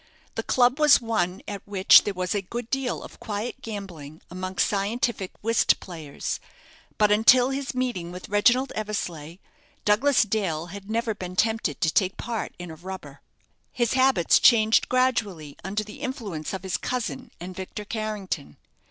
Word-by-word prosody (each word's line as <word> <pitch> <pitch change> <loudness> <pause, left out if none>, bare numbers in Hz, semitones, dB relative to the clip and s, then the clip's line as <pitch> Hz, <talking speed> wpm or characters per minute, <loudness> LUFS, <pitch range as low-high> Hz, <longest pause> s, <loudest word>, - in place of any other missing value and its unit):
The - - -2
club 250 +3 +2
was 300 -1 +7
one 200 -6 -1
at 200 -1 -5
which 195 -1 +6
there 205 - -1
was 180 +1 -1
a 205 - 0
good 235 +5 -6
deal 265 -2 -1
of - - -12
quiet 215 +2 -4
gambling 175 -9 -8
amongst 185 +1 -1
scientific 205 0 -1
whist 230 +1 +3
players; 160 -6 -5 0.6
but 210 -1 +4
until 245 +5 +6
his 270 -1 -3
meeting 240 -10 -2
with 180 +1 -8
Reginald 240 +6 +3
Eversleigh, 175 -7 -4 0.5
Douglas 250 +7 +4
Dale 195 -7 -1
had 200 0 -9
never 230 0 0
been 185 -3 -7
tempted 220 -8 0
to 160 0 +2
take 190 -2 +1
part 230 -2 -4
in 175 -1 -8
a - - -8
rubber. 185 +3 -9 0.5
His 240 -2 0
habits 260 -9 +4
changed 220 -2 +5
gradually 210 - 0
under 205 +3 -2
the 210 0 -11
influence 210 - -4
of 190 -1 -5
his 185 -4 -1
cousin 255 +3 -4
and 180 +2 -7
Victor 190 +3 -6
Carrington. 210 - -4
210 Hz, 160 wpm, -25 LUFS, 185-235 Hz, 0.6 s, was